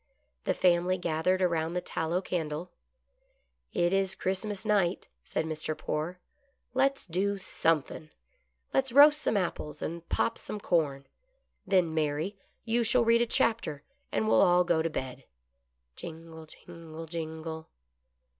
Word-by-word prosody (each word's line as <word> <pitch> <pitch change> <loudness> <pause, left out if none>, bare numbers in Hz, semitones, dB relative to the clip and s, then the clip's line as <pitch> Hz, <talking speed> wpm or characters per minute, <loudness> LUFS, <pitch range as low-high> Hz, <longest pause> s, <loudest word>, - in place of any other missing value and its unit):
The - - +1
family 180 +1 +3
gathered 180 +2 +1
around 165 -2 +1
the 180 - 0
tallow 175 +1 -2
candle. 165 0 -3 0.5
" - - -43 0.3
It 175 +1 +1
is 195 -1 +1
Christmas 195 +2 -3
night," 195 -4 +1 0.2
said 160 - -2
Mr. 155 -1 -3
Poore. 155 +3 -3 0.3
" 275 -3 -44
Let's 275 +2 +1
do 195 +3 0
somethin' 160 -4 -1 0.3
— - - -42
let's 265 -1 +2
roast 295 +3 +7
some 215 - +1
apples 150 -5 -3
and 170 +1 -5
pop 230 - 0
some 210 - -6
corn 145 -8 0 0.3
— - - -44
then, 180 -4 +3
Mary, 155 +5 -1 0.3
you 235 +1 +2
shall 235 +1 +3
read 230 +1 +5
a 240 - +2
chapter, 225 -12 +1 0.3
and 110 -1 0
we'll 110 0 +5
all 180 0 +5
go 170 -2 +2
to 165 - 0
bed." 130 -3 -5 0.7
Jingle^ 160 -1 -9 0.2
jingle^ 165 -2 -9
jmgle. 160 -1 -5
175 Hz, 145 wpm, -29 LUFS, 160-200 Hz, 0.7 s, roast